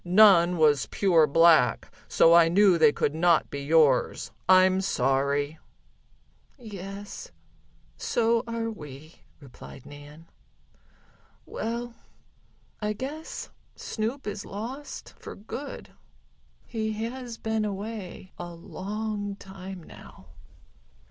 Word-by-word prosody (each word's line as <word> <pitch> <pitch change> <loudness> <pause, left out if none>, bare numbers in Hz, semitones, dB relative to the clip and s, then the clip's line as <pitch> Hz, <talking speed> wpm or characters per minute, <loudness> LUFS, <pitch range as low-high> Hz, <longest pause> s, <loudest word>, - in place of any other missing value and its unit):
None 180 -2 +6
was 150 -4 +3
pure 170 -6 +3
black, 160 -7 +4
so 165 - +5
I 170 -1 +6
knew 190 +1 +5
they 155 -2 +6
could 145 - -1
not 170 +1 +2
be 140 - -4
yours. 145 -3 +2 0.2
I'm 185 0 +5
sorry." 140 -1 0 1.0
"Yes, 200 -3 -8 0.7
so 230 0 +1
are 230 0 -3
we," 150 -4 -11 0.2
replied 135 -2 -13
Nan. 145 +2 -13 1.2
"Well, 235 +1 -4 0.9
I 210 0 -1
guess 290 +8 -7 0.2
Snoop 235 +5 -4
is 205 -1 -5
lost 255 +8 -7
for - - -9
good. 255 +7 -8 0.7
He 220 -2 -3
has 235 +2 -5
been 220 -1 -1
away 200 -2 -6
a 175 -1 -7
long 205 +3 -5
time 190 -2 -10
now." - - -15
190 Hz, 100 wpm, -27 LUFS, 160-220 Hz, 1.2 s, None